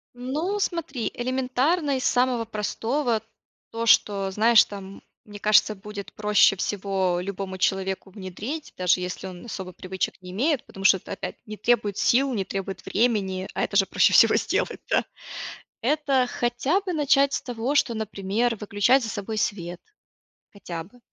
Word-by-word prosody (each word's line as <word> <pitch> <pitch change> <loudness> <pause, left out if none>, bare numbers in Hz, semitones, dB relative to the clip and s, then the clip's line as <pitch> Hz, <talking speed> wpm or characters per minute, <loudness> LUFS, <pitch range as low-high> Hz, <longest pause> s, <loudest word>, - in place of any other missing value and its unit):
Ну 300 +11 -2
смотри, 315 - -2
элементарно 265 +5 0
из 255 - -4
самого 245 -2 +2
простого: 225 +3 -1 0.5
то, 230 0 -3
что 195 -2 +4
знаешь 220 +3 +6
там, 195 -1 -9 0.2
мне 205 -1 -10
кажется, 215 +1 +4
будет 205 0 -9
проще 210 -2 +4
всего 190 -2 -1
любому 190 0 -5
человеку 190 +1 -1
внедрить. 210 - -6
Даже 180 0 +3
если 180 +1 -5
он 180 +1 -10
особо 190 -5 -6
привычек 185 0 -4
не 180 0 -9
имеет. 265 - 0
Потому 195 - -10
что 190 -2 +6
опять 195 - -6
не 215 0 -7
требует 210 -2 +1
сил, 265 +2 +3
не 200 -4 -1
требует 195 -1 -5
времени, 195 -5 0
а - - 0
это - - -3
же 195 -1 +5
проще - - +3
всего - - +7
сделать, - - -1
да - - +3 0.8
Это 275 -1 +2
хотя 245 +11 0
бы 380 -2 -4
начать 280 -2 +3
с - - -1
того, 245 +3 -2
что, 240 -4 +2
например, 220 +2 -1
выключать 210 +5 +2
за - - -4
собой 215 +1 -4
свет, 175 -4 -2 0.7
хотя 175 -5 -7
бы. 225 +8 -20
215 Hz, 155 wpm, -25 LUFS, 195-255 Hz, 0.8 s, всего